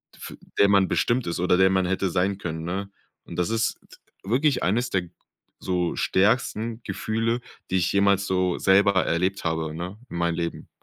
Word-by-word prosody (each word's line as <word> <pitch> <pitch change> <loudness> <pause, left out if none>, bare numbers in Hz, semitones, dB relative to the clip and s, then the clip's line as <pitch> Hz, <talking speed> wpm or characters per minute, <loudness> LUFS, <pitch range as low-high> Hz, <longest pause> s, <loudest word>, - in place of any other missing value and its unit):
f - - -9 0.2
der 100 - +7
man 100 -2 +4
bestimmt 120 +1 +1
ist 85 - -2
oder 90 +1 +3
der 95 0 +5
man 95 -1 +2
hätte 95 +1 0
sein 95 +3 0
können, 80 -4 -5
ne? 100 +3 -4 0.3
Und 85 - -10
das 90 +4 0
ist 115 0 0
d - - -18 0.3
wirklich 135 +4 +2
eines 120 +7 +1
der 95 -5 0 0.6
so 90 -2 -1
stärksten 110 +2 +1
Gefühle, 115 +2 -1 0.3
die 95 - +1
ich 90 -1 +1
jemals 100 0 +3
so 90 -1 +1
selber 95 -1 +4
erlebt 90 +4 0
habe, 80 -1 -1
ne, 90 +5 -6
in - - -6
meinem 85 -1 0
Leben. 85 -1 -4
95 Hz, 185 wpm, -25 LUFS, 90-100 Hz, 0.6 s, der